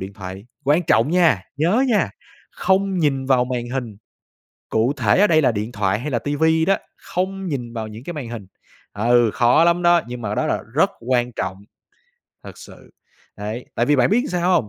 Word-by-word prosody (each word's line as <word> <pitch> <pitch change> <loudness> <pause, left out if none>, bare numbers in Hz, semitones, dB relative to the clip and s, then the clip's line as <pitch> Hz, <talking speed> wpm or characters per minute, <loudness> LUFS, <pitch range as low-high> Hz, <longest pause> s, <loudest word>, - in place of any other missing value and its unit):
điện 95 +1 -6
thoại, 95 +2 -9 0.2
quan 150 +5 +3
trọng 120 -1 +2
nha, 170 - +3
nhớ 185 - +2
nha, 195 - +2 0.4
không 190 0 0
nhìn 135 -4 0
vào 130 -2 +3
màn 125 -1 -4
hình, 120 -6 -4 0.7
cụ 115 +5 +1
thể 110 - +2
ở 210 - +6
đây 155 -1 +4
là 130 - +3
điện 110 +2 -4
thoại 100 -1 0
hay 150 +4 -5
là 120 - 0
TV 145 +5 -2 0.2
đó, 195 - +3 0.2
không 190 +1 -4
nhìn 125 -7 -4
vào 110 -2 -4
những 110 +3 -10
cái 175 - -6
màn 135 -6 -6
hình. 110 -5 -8 0.5
Ừ, 120 +2 +3
khó 120 +7 +4
lắm 170 +1 +3
đó, 175 -1 +5
nhưng 120 0 -7
mà 105 -1 -3
đó - - 0
là - - -1
rất - - +4 0.2
quan 125 -1 +1
trọng, 95 -3 -4 0.9
thật - - -11
sự, - - -14 0.5
đấy. 110 +4 -6
Tại 120 - 0
vì 145 0 +3
bạn 130 +7 +3
biết 245 +5 +2
sao 175 +1 +1
hông? 115 -12 +2
125 Hz, 205 wpm, -21 LUFS, 110-170 Hz, 0.9 s, ở